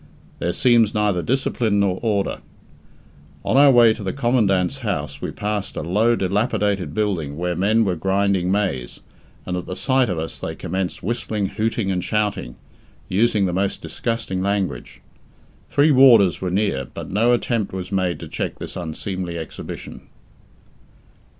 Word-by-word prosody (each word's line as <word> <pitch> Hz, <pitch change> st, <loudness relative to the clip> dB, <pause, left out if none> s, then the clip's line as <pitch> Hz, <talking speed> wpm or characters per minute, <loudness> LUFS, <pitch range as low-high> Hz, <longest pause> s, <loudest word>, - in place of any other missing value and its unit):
There 85 Hz, -, 0 dB
seems 115 Hz, -1 st, +3 dB
neither 105 Hz, -4 st, +1 dB
discipline 115 Hz, -3 st, 0 dB
nor 95 Hz, -2 st, +1 dB
order. 105 Hz, -4 st, 0 dB, 1.1 s
On -, -, +1 dB
our 140 Hz, +1 st, +7 dB
way 120 Hz, -4 st, +6 dB
to 110 Hz, -, -9 dB
the 95 Hz, -2 st, -2 dB
Commandant's 110 Hz, -9 st, +1 dB
house -, -, -3 dB
we -, -, -3 dB
passed 105 Hz, -1 st, -3 dB
a -, -, -2 dB
low 105 Hz, +8 st, +2 dB
dilapidated 100 Hz, 0 st, 0 dB
building 90 Hz, -10 st, -1 dB
where 90 Hz, +1 st, -1 dB
men 110 Hz, +5 st, +2 dB
were 95 Hz, -2 st, 0 dB
grinding 95 Hz, +1 st, +1 dB
maize, 95 Hz, -12 st, -2 dB, 0.4 s
and 90 Hz, -, -3 dB
at 90 Hz, -, -5 dB
the 90 Hz, -, -4 dB
sight 130 Hz, 0 st, +1 dB
of 90 Hz, -, -2 dB
us 80 Hz, +1 st, -5 dB
they -, -, -5 dB
commenced 95 Hz, +1 st, -4 dB
whistling, 105 Hz, -1 st, -2 dB
hooting, 110 Hz, -2 st, -1 dB
and 90 Hz, -2 st, -1 dB
shouting, 105 Hz, -, -1 dB, 0.5 s
using 105 Hz, +1 st, +2 dB
the 90 Hz, -, -1 dB
most 95 Hz, +2 st, -1 dB
disgusting 115 Hz, -5 st, -3 dB
language. 95 Hz, -10 st, -2 dB, 0.7 s
Three 145 Hz, +2 st, +4 dB
warders 120 Hz, -9 st, +6 dB
were 95 Hz, -, -1 dB
near, 90 Hz, -8 st, 0 dB
but -, -, -7 dB
no 115 Hz, +5 st, +3 dB
attempt 120 Hz, -3 st, 0 dB
was 95 Hz, 0 st, -6 dB
made 95 Hz, -3 st, 0 dB
to -, -, -7 dB
check -, -, -4 dB
this -, -, -8 dB
unseemly 90 Hz, +1 st, -4 dB
exhibition. 80 Hz, -1 st, -8 dB
100 Hz, 155 wpm, -21 LUFS, 90-110 Hz, 1.1 s, our